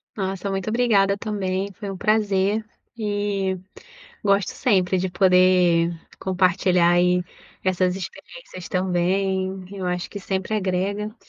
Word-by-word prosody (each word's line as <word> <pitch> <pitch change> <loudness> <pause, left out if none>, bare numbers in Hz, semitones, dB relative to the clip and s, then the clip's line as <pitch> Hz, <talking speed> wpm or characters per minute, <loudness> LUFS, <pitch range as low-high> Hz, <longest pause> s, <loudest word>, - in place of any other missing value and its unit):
Nossa, 195 -1 -3
muito 195 +2 -2
obrigada 210 -4 +3
também, 200 -2 -2
foi 200 +1 -7
um 195 - -5
prazer. 210 0 +1 0.3
E, 205 -3 -1 0.7
gosto 200 -1 +2
sempre 190 -5 +1
de 185 +1 0
poder 180 -2 +4 0.3
compartilhar 180 -1 +2
aí 180 +1 +3 0.4
essas 185 -1 +1
experiências 190 - -9
também. 190 +1 0
Eu 190 -2 -5
acho 180 0 -2
que 200 - -7
sempre 190 +2 -2
agrega. 200 +2 -2
190 Hz, 115 wpm, -23 LUFS, 185-200 Hz, 0.7 s, poder